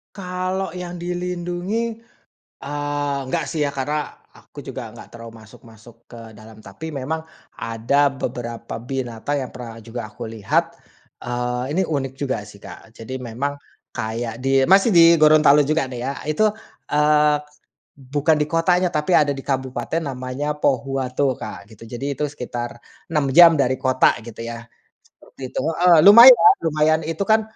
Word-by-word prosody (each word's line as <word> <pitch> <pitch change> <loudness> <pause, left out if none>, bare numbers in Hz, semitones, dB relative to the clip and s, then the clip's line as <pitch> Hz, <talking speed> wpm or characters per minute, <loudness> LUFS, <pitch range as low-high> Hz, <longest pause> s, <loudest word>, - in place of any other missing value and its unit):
Kalau 185 -1 -4
yang 180 -1 -7
dilindungi, 180 +4 -3 0.7
eee, 145 0 -3
nggak - - -1
sih 155 - -4
ya, 145 - +1
karena 145 +2 -4 0.2
aku - - -14
juga - - -7
ngga - - -12
terlalu 115 -1 -11
masuk-masuk 115 +2 -18
ke 115 -2 -12
dalam. 110 +1 -14
Tapi 110 +10 -9
memang 155 +2 -4 0.3
ada 120 +6 0
beberapa 120 -3 -6
binatang 125 +2 -4
yang - - -11
pernah 120 -3 -9
juga 115 -1 -8
aku 120 +2 -8
lihat, 110 -3 -1 0.5
eee, 125 0 -3
ini - - +3
unik 135 -4 -3
juga 130 -6 -2
sih 100 - -14
Kak. 110 - -13
Jadi 130 +3 -7
memang 125 +4 -3 0.4
kayak 115 +1 -4
di 135 0 +2
masih 195 - +5
di 170 -4 +7
Gorontalo 150 -1 +6
juga 155 0 0
nih 125 -2 -7
ya 135 +3 -3
itu, 185 +9 +2 0.4
eee, 150 0 +3 0.6
bukan 145 +4 0
di 150 - +1
kotanya 180 +2 +2
tapi 150 +4 -1
ada 145 -3 +3
di 135 - -7
Kabupaten 130 +4 -2
namanya 140 0 -4
Pohuwato 135 -1 -1
Kak 100 - -9
gitu, 110 0 -17
jadi 135 +5 -5
itu 150 - -2
sekitar 120 -4 -6 0.3
6 150 -3 +1
jam 170 -1 +9
dari 130 -1 +2
kota 130 0 +2
gitu 115 -1 -12
ya 115 0 -7 0.5
seperti 130 -2 -12
itu - - -5
heeh, 170 +1 +4
lumayan 235 -3 +9
lumayan 155 0 +2
itu 160 +3 -5
kan, 220 0 +3
140 Hz, 150 wpm, -21 LUFS, 120-160 Hz, 0.7 s, jam